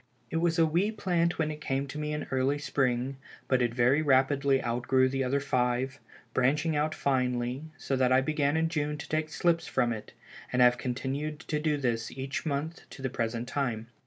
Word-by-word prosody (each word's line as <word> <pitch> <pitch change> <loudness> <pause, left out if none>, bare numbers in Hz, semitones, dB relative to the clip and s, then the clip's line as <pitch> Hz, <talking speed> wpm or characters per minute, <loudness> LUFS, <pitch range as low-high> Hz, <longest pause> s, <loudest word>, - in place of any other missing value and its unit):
It 165 - 0
was 170 0 +1
a 165 - +5
wee 175 +7 +1
plant 175 -5 0
when 155 -1 0
it 150 0 -8
came 135 -1 -1
to 140 +2 -7
me 150 0 -2
in 150 0 -3
early 130 +2 +1
spring, 130 -2 0 0.3
but 130 -1 +2
it 120 -1 +2
very 125 +5 +4
rapidly 135 -1 +3
outgrew 125 +2 +2
the 135 0 -1
other 135 +2 +1
five, 130 0 0 0.3
branching 150 +5 +2
out 155 +1 0
finely, 125 0 0
so 135 - -2
that 130 -1 +2
I 130 - +6
began 145 +1 +1
in 160 0 +2
June 150 -2 -1
to 150 - -8
take 155 0 -1
slips 170 +1 +1
from 120 -1 +1
it, 110 - -8 0.4
and 125 - 0
have 125 0 +5
continued 140 +5 -3
to 150 -3 -2
do 150 -1 +1
this 120 -4 -1
each 135 +4 -4
month 155 +4 -3
to 135 - -11
the 130 - -1
present 115 -1 -2
time. 120 -5 -2
135 Hz, 200 wpm, -29 LUFS, 125-150 Hz, 0.4 s, I